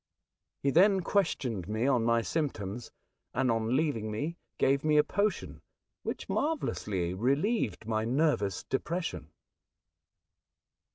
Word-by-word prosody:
He 140 - +3
then 190 +5 +5
questioned 130 - 0
me 110 +3 -1
on 130 -4 +3
my 115 0 +2
symptoms, 120 -8 -3 0.5
and, 125 - +2
on 115 +2 0
leaving 135 -8 0
me, 145 +11 -3 0.2
gave 135 +1 +2
me 155 -1 +3
a 150 - +7
potion 205 0 -1 0.4
which - - -5
marvellously 105 - -1
relieved 135 - 0
my 110 -1 0
nervous 115 - +1
depression. 165 - -3
130 Hz, 115 wpm, -30 LUFS, 110-160 Hz, 0.5 s, a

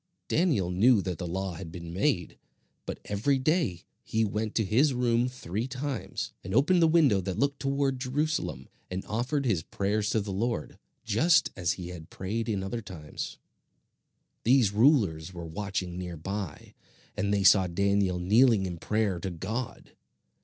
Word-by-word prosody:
Daniel 145 - +1
knew 110 +6 +5
that 90 -4 -3
the 90 - -3
law 95 +2 -3
had 85 -1 -8
been 85 -1 -8
made, 95 - 0 0.5
but - - -4
every 110 +8 +1
day 130 - 0 0.2
he 110 0 0
went 105 +1 -3
to 110 - +2
his 130 +8 +3
room 120 0 +2
three 115 -2 -4
times, 135 -1 -4
and 95 +3 -4
opened 170 +8 +4
the 165 - +6
window 150 - +4
that 95 -1 -4
looked 140 0 0
toward 135 -1 0
Jerusalem, 130 - -2 0.2
and 95 +1 -4
offered 130 +6 -1
his 100 -9 +1
prayers 105 +5 -1
to 110 - +2
the 100 -1 -4
Lord, 115 -3 -2 0.3
just 165 - +3
as 90 -2 0
he 90 -1 -7
had 85 -2 -9
prayed 110 +5 -3
in 100 -3 -1
other 115 +4 -3
times. 90 -7 -7 1.1
These 120 -4 +4
rulers 100 - +3
were 85 -1 -6
watching 90 0 -4
near 90 -2 -5
by, 95 0 -5 0.4
and 100 0 0
they 100 -1 +2
saw 95 -1 +6
Daniel 100 +1 +1
kneeling 105 +3 +4
in 90 -2 -5
prayer 105 -3 0
to 95 - -3
God. 105 +8 -5
105 Hz, 165 wpm, -28 LUFS, 90-125 Hz, 1.1 s, the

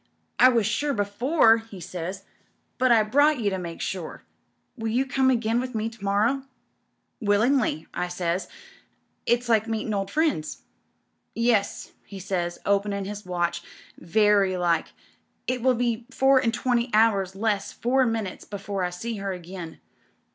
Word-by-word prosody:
'I 255 - +8
was 230 -4 +2
sure 280 +7 0
before,' 225 +4 +3
he 225 -4 -11
says, 180 +2 -6 0.6
'but 255 -1 +4
I 225 -2 +6
brought 285 +6 +3
you 205 -3 0
to 190 - -2
make 170 -2 -7
sure. 180 -4 -5 0.5
Will 225 -3 -4
you 245 +4 +1
come 265 0 +2
again 230 -2 +1
with 255 -2 -6
me 220 +1 -1
to 225 -3 -15
morrow? 210 +7 +1 0.4
' - - -49
"'TWUingly,* 215 - +2
I 180 - -2
says, 175 +1 -2 0.8
'it's 240 +1 +2
like 225 -1 +2
meetin' 220 -1 -2
old 195 -1 -2
friends.* 300 - -1 0.7
"'Yes,' 230 -3 0
he 200 - -10
says, 180 -2 -3
openin' 200 0 0
his 205 -1 -7
watch, 175 -1 -1 0.4
'very 200 +1 +3
like. 170 -2 +1 0.6
It 250 -1 -1
will 255 +1 +3
be 235 0 -1
four 265 0 +4
and 230 -3 +1
twenty 245 +1 0
hours 200 -4 +3
less 205 -1 -1
four 255 +2 +1
minutes 220 -5 -3
before 200 -1 -4
I 180 - 0
see 220 +6 -5
her 195 -1 -3
again. 180 -2 -8
215 Hz, 155 wpm, -25 LUFS, 190-240 Hz, 0.8 s, I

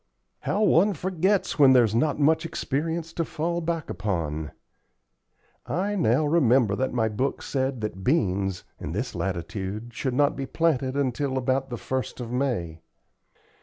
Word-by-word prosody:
"How 210 +2 0
one 200 +1 +4
forgets 185 +2 0
when 135 -2 +8
there's 120 -4 +4
not 145 +6 +1
much 155 +4 +3
experience 160 +1 -3
to 165 - -1
fall 170 +2 -2
back 165 -1 -2
upon! 80 -7 -2 1.2
I 195 +4 -1
now 155 - +2
remember 130 -9 +3
that 130 +4 -1
my 115 -2 +1
book 125 +6 -2
said 130 -3 -1
that 95 -3 -4
beans, 95 - +1 0.2
in - - -5
this - - -3
latitude, 95 +5 -4
should 130 +1 -2
not 145 +1 +3
be 135 -1 -4
planted 140 -5 0
until 135 0 0
about 130 +1 0
the 120 - -3
1st 130 +3 -4
of 120 -2 -5
May." 115 - -2
130 Hz, 150 wpm, -26 LUFS, 110-160 Hz, 1.2 s, when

